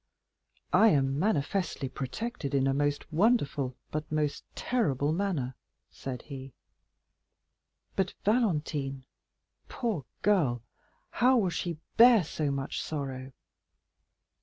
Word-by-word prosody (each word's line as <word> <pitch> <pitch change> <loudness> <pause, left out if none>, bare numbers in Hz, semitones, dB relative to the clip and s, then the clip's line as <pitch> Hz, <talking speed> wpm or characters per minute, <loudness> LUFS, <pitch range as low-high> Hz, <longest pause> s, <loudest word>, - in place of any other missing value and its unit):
"I 225 - +7
am 135 -6 +2
manifestly 175 -4 0
protected 140 - -4
in 135 -1 +3
a 135 - +2
most 145 +2 -1
wonderful, 150 - +2
but 155 0 -4
most 150 -1 0
terrible 150 - +1
manner," 165 -9 -1 0.4
said 130 -2 -6
he; 135 -3 -9 1.4
"but 190 -1 0
Valentine, 150 - 0 0.6
poor 215 - -2 0.2
girl, 145 - +2 0.5
how 255 +1 +4
will 190 -6 +2
she 170 -2 -3 0.2
bear 230 -3 +8
so 150 -1 -2
much 140 -1 -2
sorrow?" 135 -3 -4
150 Hz, 105 wpm, -29 LUFS, 135-200 Hz, 1.4 s, bear